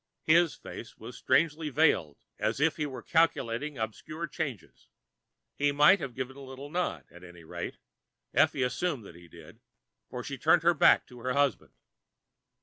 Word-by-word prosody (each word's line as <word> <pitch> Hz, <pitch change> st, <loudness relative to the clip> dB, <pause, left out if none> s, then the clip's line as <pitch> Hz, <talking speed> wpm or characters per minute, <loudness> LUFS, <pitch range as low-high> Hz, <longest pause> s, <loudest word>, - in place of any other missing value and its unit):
His 165 Hz, 0 st, +4 dB
face 115 Hz, -, -10 dB
was 120 Hz, +3 st, -10 dB
strangely 155 Hz, +3 st, +1 dB
veiled, 140 Hz, -, +2 dB, 0.2 s
as -, -, -1 dB
if 155 Hz, +2 st, +2 dB
he 150 Hz, -2 st, -1 dB
were 130 Hz, -2 st, -8 dB
calculating 150 Hz, -4 st, 0 dB
obscure 155 Hz, +9 st, -5 dB
changes. 140 Hz, -, -6 dB, 0.7 s
He 145 Hz, 0 st, +1 dB
might 150 Hz, +7 st, +6 dB
have 130 Hz, -4 st, -6 dB
given 130 Hz, 0 st, -5 dB
a -, -, -12 dB
little 135 Hz, +2 st, -9 dB
nod; 180 Hz, +1 st, -2 dB
at 90 Hz, +1 st, -14 dB
any 85 Hz, -1 st, -13 dB
rate, 80 Hz, -, -6 dB, 0.6 s
Effie 130 Hz, -, +3 dB
assumed 130 Hz, -, -2 dB
that 90 Hz, -, -11 dB
he 85 Hz, 0 st, -15 dB
did, 85 Hz, -1 st, -15 dB, 0.5 s
for -, -, -6 dB
she -, -, -6 dB
turned -, -, +3 dB
back -, -, +6 dB
to 125 Hz, -, -14 dB
her 125 Hz, +2 st, -2 dB
husband. 140 Hz, -5 st, 0 dB
135 Hz, 160 wpm, -29 LUFS, 115-155 Hz, 0.7 s, might